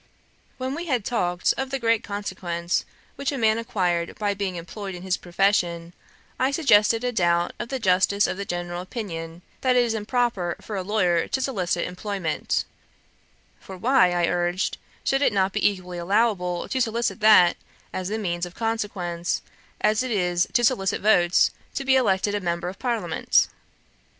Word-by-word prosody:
When 260 Hz, +1 st, -3 dB
we 340 Hz, +4 st, -5 dB
had 250 Hz, -8 st, 0 dB
talked 180 Hz, -7 st, +1 dB
of 265 Hz, 0 st, -2 dB
the 270 Hz, -, -1 dB
great 230 Hz, -3 st, +1 dB
consequence 185 Hz, -4 st, -3 dB, 0.3 s
which 280 Hz, 0 st, -1 dB
a 280 Hz, -, -3 dB
man 220 Hz, -2 st, +2 dB
acquired 180 Hz, -8 st, -1 dB
by 205 Hz, -1 st, 0 dB
being 195 Hz, -2 st, -3 dB
employed 190 Hz, +3 st, -6 dB
in 175 Hz, -, -9 dB
his 190 Hz, -1 st, 0 dB
profession, 175 Hz, -2 st, 0 dB, 0.5 s
I 260 Hz, -, +3 dB
suggested 230 Hz, -6 st, +4 dB
a 250 Hz, -, 0 dB
doubt 175 Hz, -5 st, +1 dB
of 235 Hz, -, -5 dB
the 270 Hz, -, -2 dB
justice 200 Hz, -1 st, +3 dB
of -, -, -1 dB
the 200 Hz, -, -4 dB
general 175 Hz, -1 st, -4 dB
opinion, 175 Hz, -5 st, -6 dB, 0.2 s
that 255 Hz, -1 st, +2 dB
it 245 Hz, -, +5 dB
is 230 Hz, -, -1 dB
improper 220 Hz, -5 st, -1 dB
in 215 Hz, -, -4 dB
a 190 Hz, -, -1 dB
lawyer 180 Hz, -4 st, +1 dB
to -, -, -1 dB
solicit 190 Hz, -10 st, -1 dB
employment; 180 Hz, -2 st, -2 dB, 0.9 s
for 190 Hz, -, -10 dB
why, 230 Hz, -3 st, +4 dB
I 175 Hz, -1 st, +2 dB
urged, 175 Hz, +1 st, -1 dB, 0.2 s
should 270 Hz, +1 st, +1 dB
it -, -, +4 dB
not 190 Hz, -1 st, +1 dB
be -, -, +3 dB
equally 180 Hz, -3 st, -7 dB
allowable 180 Hz, -2 st, +1 dB
to 260 Hz, -, 0 dB
solicit 230 Hz, 0 st, 0 dB
that 210 Hz, -5 st, +6 dB, 0.4 s
as 185 Hz, -1 st, -3 dB
the 215 Hz, +3 st, -2 dB
means 175 Hz, -4 st, -2 dB
of 175 Hz, -, -14 dB
consequence, 200 Hz, -7 st, -2 dB, 0.4 s
as 215 Hz, +2 st, +3 dB
it 255 Hz, -, -2 dB
is 180 Hz, -4 st, +1 dB
to 240 Hz, -, +3 dB
solicit 220 Hz, -6 st, +1 dB
votes 180 Hz, -4 st, +4 dB, 0.2 s
to 275 Hz, -, -3 dB
be 265 Hz, 0 st, +4 dB
elected 205 Hz, -5 st, +2 dB
a 205 Hz, -, -1 dB
member 170 Hz, 0 st, -2 dB
of 190 Hz, -, -10 dB
Parliament? 240 Hz, -3 st, +1 dB
200 Hz, 175 wpm, -24 LUFS, 175-230 Hz, 0.9 s, that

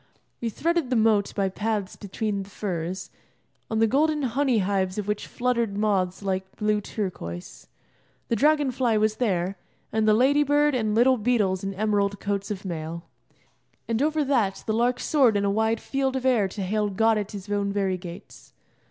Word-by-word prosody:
We 235 Hz, -, -1 dB
threaded 330 Hz, +4 st, 0 dB
the 255 Hz, -, +1 dB
moat 215 Hz, -3 st, +3 dB
by 195 Hz, -2 st, +1 dB
paths 210 Hz, 0 st, -2 dB
between 205 Hz, 0 st, -3 dB
the 195 Hz, -, -9 dB
furze, 185 Hz, -3 st, -4 dB, 0.6 s
on 220 Hz, -, -1 dB
the 225 Hz, -, +4 dB
golden 300 Hz, +5 st, +2 dB
honey 260 Hz, 0 st, +1 dB
hives 190 Hz, -1 st, 0 dB
of 210 Hz, -1 st, -3 dB
which 210 Hz, 0 st, -2 dB
fluttered 235 Hz, -4 st, -1 dB
moths 200 Hz, -3 st, 0 dB
like 190 Hz, 0 st, -3 dB
blue 210 Hz, 0 st, 0 dB
turquoise. 130 Hz, -, -6 dB, 0.6 s
The 230 Hz, -, +1 dB
dragon 290 Hz, +2 st, +3 dB
fly 245 Hz, -3 st, +1 dB
was 215 Hz, 0 st, +1 dB
there, 190 Hz, -5 st, 0 dB, 0.3 s
and 220 Hz, 0 st, +1 dB
the 215 Hz, -, +5 dB
lady 275 Hz, +5 st, +4 dB
bird 295 Hz, +1 st, +3 dB
and 220 Hz, -4 st, 0 dB
little 255 Hz, +3 st, +5 dB
beetles 210 Hz, -5 st, +1 dB
in 195 Hz, 0 st, -3 dB
emerald 200 Hz, -1 st, 0 dB
coats 200 Hz, -1 st, -2 dB
of 200 Hz, -2 st, -5 dB
mail. 165 Hz, -1 st, -5 dB, 0.8 s
And 230 Hz, +1 st, 0 dB
over 305 Hz, +1 st, +2 dB
that 235 Hz, -9 st, 0 dB
the 220 Hz, -, 0 dB
lark 240 Hz, +2 st, +1 dB
soared 255 Hz, -8 st, +3 dB
in 200 Hz, -, 0 dB
a 200 Hz, -, +2 dB
wide 220 Hz, +2 st, +1 dB
field 270 Hz, -1 st, -1 dB
of 260 Hz, -1 st, -2 dB
air 235 Hz, -6 st, +3 dB
to 195 Hz, +1 st, -5 dB
hail 210 Hz, +2 st, 0 dB
God 220 Hz, +2 st, +2 dB
at 205 Hz, 0 st, -5 dB
His 200 Hz, -1 st, -7 dB
own 205 Hz, -1 st, -1 dB
very 195 Hz, -2 st, 0 dB
gates. 175 Hz, -1 st, -11 dB
215 Hz, 185 wpm, -25 LUFS, 195-245 Hz, 0.8 s, the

